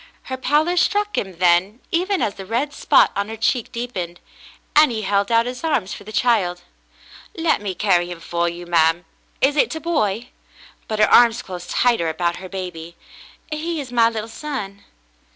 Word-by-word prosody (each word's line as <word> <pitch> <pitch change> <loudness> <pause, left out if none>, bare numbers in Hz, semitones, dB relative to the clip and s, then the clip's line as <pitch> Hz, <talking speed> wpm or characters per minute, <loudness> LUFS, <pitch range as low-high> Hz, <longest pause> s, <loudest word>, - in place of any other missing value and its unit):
Her 260 - -5
pallor 300 +7 +1
struck 415 +3 +1
him 190 -3 -3
then, 180 +5 +2
even 370 +2 +1
as 205 - 0
the 195 - -9
red 255 +7 -1
spot - - +4
on 200 +1 -2
her 225 - -6
cheek 225 +1 0
deepened, 190 -8 -5 0.6
and 300 -1 +7
he 220 -2 -3
held 200 +1 0
out 230 0 +4
his 250 +5 -6
arms 240 - 0
for - - -9
the 215 - -9
child. 205 -6 +1 0.7
"Let 325 -7 +1
me 195 -3 -4
carry 175 -2 +2
'im 175 -1 -7
for 170 +1 -1
you, 175 +1 -8
ma'm. 165 0 +2 0.4
Is 280 +2 +3
it 300 - +2
a - - -4
boy.^^" 245 - -1 0.6
But 215 - -3
her 215 - +3
arms 235 -1 +6
closed 180 -1 -8
tighter 235 -10 +2
about 170 +2 -1
her 185 0 -9
baby. 175 -3 -7 0.6
"He 320 +2 -3
is 265 -4 -7
my 230 -2 +4
little 220 -1 -5
son." 225 -6 -6
215 Hz, 185 wpm, -21 LUFS, 180-270 Hz, 0.7 s, and